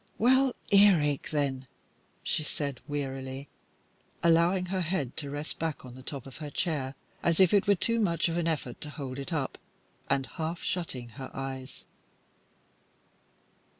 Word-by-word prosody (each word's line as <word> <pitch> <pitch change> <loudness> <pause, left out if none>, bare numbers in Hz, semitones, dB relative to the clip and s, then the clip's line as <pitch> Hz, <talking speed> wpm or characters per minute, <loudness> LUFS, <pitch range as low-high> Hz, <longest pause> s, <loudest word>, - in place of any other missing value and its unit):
"Well, 260 +2 +4 0.2
earache, 180 -9 +5
then?" 135 -3 0 0.6
she - - +1
said, 140 -4 -3
wearily, 135 -1 -4 0.7
allowing 170 +2 +4
her 185 +1 -1
head 155 -7 -1
to 145 -3 -3
rest 145 +2 -4
back 160 -4 -2
on 125 - -9
the 130 - -10
top 135 -1 -5
of 135 - -10
her 150 -1 -5
chair, 140 -4 -1 0.3
as 170 0 +2
if 190 -1 +6
it 205 0 +4
were 200 - +6
too 230 +5 +1
much 170 -7 +2
of 165 - -1
an 170 -1 +1
effort 145 -7 -2
to 150 - -3
hold 140 -3 -5
it 140 +5 -5
up, 145 -5 -1 0.5
and 135 -1 +2
half 165 +2 -4
shutting 130 -9 -2
her 130 +4 -8
eyes. 135 -1 -6
150 Hz, 155 wpm, -30 LUFS, 135-175 Hz, 0.7 s, if